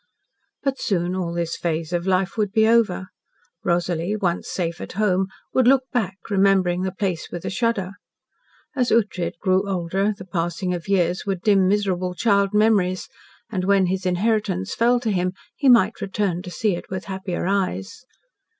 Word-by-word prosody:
But 275 -1 -1
soon 180 -2 0
all 180 -3 -2
this 170 -1 -2
phase 165 0 -2
of 175 +1 -1
life 185 0 +1
would 210 -3 0
be 220 0 +4
over. 210 -5 +2 0.5
Rosalie, 175 +2 0
once 180 -4 -1
safe 170 -2 -3
at - - -7
home, 190 -2 +1 0.3
would 260 -2 +3
look 265 0 +5
back, 195 -6 -1
remembering 190 -2 +3
the 190 0 -1
place 185 -3 -3
with 175 - -6
a - - -2
shudder. 210 -4 0 0.8
As 250 -3 +1
Ughtred 195 -7 +1
grew 190 +2 +1
older 190 +2 0
the 190 - -9
passing 175 0 -2
of 175 0 -5
years 180 -1 +1
would 190 -3 -1
dim 195 -3 +4
miserable 185 -3 0
child 200 -2 +2
memories, 210 -4 +2 0.4
and 185 -4 -2
when 195 -1 +4
his 185 +1 -1
inheritance 180 - 0
fell 240 +1 +3
to 225 -3 0
him 180 -1 0 0.2
he 280 - +2
might 230 -3 +4
return 195 -3 -1
to 180 - -8
see 200 +1 0
it - - -9
with 185 -1 -5
happier 190 -2 -4
eyes. 185 - -2
190 Hz, 170 wpm, -23 LUFS, 180-210 Hz, 0.8 s, look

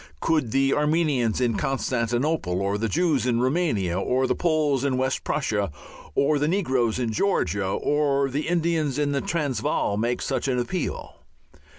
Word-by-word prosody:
Could 155 - +1
the 135 +3 +2
Armenians 150 -7 +1
in 120 -3 +1
Constantinople, 125 - -1
or 100 +1 -1
the 115 0 -1
Jews 155 -5 +1
in 120 -2 +1
Roumania, 125 - 0
or 130 +6 +1
the - - +1
Poles 155 -6 +1
in 135 -2 0
West 130 0 -1
Prussia, 105 - -1 0.4
or 145 +1 +2
the 150 - +1
negroes 130 - +1
in 120 -3 -1
Georgia, 100 - 0
or 140 +5 +1
the 140 +3 -3
Indians 165 -5 0
in 145 -1 +1
the 140 -1 0
Transvaal 140 -9 -1
make 120 +3 -1
such - - -2
an 130 -2 0
appeal? 145 +8 -3
135 Hz, 160 wpm, -24 LUFS, 115-150 Hz, 0.4 s, the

